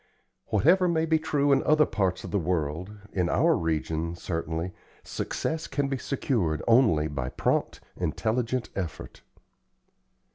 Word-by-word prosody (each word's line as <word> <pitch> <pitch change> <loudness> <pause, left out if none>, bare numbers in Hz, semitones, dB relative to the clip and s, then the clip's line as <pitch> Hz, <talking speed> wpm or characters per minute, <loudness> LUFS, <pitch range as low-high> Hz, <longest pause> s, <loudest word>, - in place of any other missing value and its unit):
Whatever 180 +3 +4
may 165 -2 +1
be 160 0 +2
true 145 -2 +1
in 135 - +4
other 155 0 +4
parts 95 -3 -1
of - - -7
the 100 - +1
world, 85 +1 -2 0.2
in 90 -2 +1
our 165 - +3
region, 80 +1 -1
certainly, 85 0 -3 0.3
success 160 +1 -3
can 140 0 -1
be 135 -2 -2
secured 105 - -1
only 115 - +4
by 70 -4 -3
prompt, - - -1
intelligent 120 +1 -1
effort. 90 -4 -5
100 Hz, 135 wpm, -27 LUFS, -, 0.3 s, Whatever